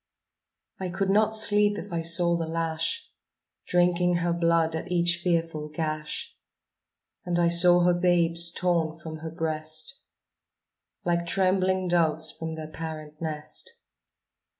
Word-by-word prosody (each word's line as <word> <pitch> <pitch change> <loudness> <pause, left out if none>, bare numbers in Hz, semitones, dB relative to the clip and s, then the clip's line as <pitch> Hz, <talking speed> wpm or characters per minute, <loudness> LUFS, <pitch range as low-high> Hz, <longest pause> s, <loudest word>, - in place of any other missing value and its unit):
I 185 -1 -3
could 195 +2 -1
not 215 +2 +3
sleep 210 -1 +4
if - - -8
I 165 - -1
saw 170 +1 +4
the 165 -1 -3
lash 165 - -3 0.6
Drinking 175 0 +2
her 170 0 0
blood 165 -1 +1
at 160 - -6
each 175 -1 +2
fearful 165 -3 -1
gash, 155 0 -5 0.9
And 175 -1 -1
I 170 -1 +3
saw 175 +1 +6
her 175 0 +3
babes 170 -1 +2
torn 170 -2 -1
from 160 0 -8
her 160 +1 -7
breast, 155 - -2 1.1
Like 170 0 0
trembling 185 0 +1
doves 165 -3 +2
from 160 0 -6
their 160 -1 -7
parent 155 -1 -8
nest. 155 -2 -4
170 Hz, 130 wpm, -26 LUFS, 160-180 Hz, 1.1 s, saw